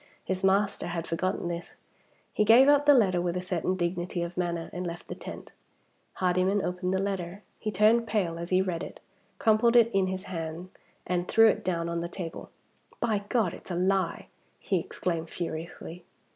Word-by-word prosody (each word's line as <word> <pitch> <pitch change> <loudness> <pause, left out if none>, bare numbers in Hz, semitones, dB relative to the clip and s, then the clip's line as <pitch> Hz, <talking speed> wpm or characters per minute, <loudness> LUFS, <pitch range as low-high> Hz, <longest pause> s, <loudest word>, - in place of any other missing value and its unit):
His 185 0 -2
master 195 -1 +2
had 170 -1 -3
forgotten 175 +2 -2
this. 170 0 -5 0.6
He - - +2
gave 235 +5 +7
up 290 0 +4
the 290 - +9
letter 190 -7 +3
with 175 0 -1
a - - 0
certain 180 0 -1
dignity 175 0 -2
of 170 +1 -6
manner, 170 -2 -2
and 180 0 -3
left 170 0 -7
the - - -3
tent. - - -9 0.6
Hardyman 185 +2 +1
opened 180 0 -2
the 190 - +1
letter. 195 0 -4 0.2
He 215 - -3
turned 215 +3 +3
pale 180 -7 -1
as 170 +1 -5
he 185 0 +3
read 175 -3 -3
it; - - -8 0.4
crumpled 235 -2 +3
it 230 -1 +6
in 195 -1 +2
his 185 0 -3
hand, 165 0 -6 0.3
and 180 0 -1
threw 225 0 +6
it - - -1
down 170 -2 -1
on 170 0 -2
the 170 0 -4
table. 170 -3 -7 0.5
"By 220 -4 +1
G 200 - -15
d! 220 -9 +1
it's - - -13
a 175 - -2
lie!" 185 0 0 0.3
he 190 - 0
exclaimed 165 -1 -3
furiously. 170 +1 -6
185 Hz, 190 wpm, -28 LUFS, 170-200 Hz, 0.6 s, the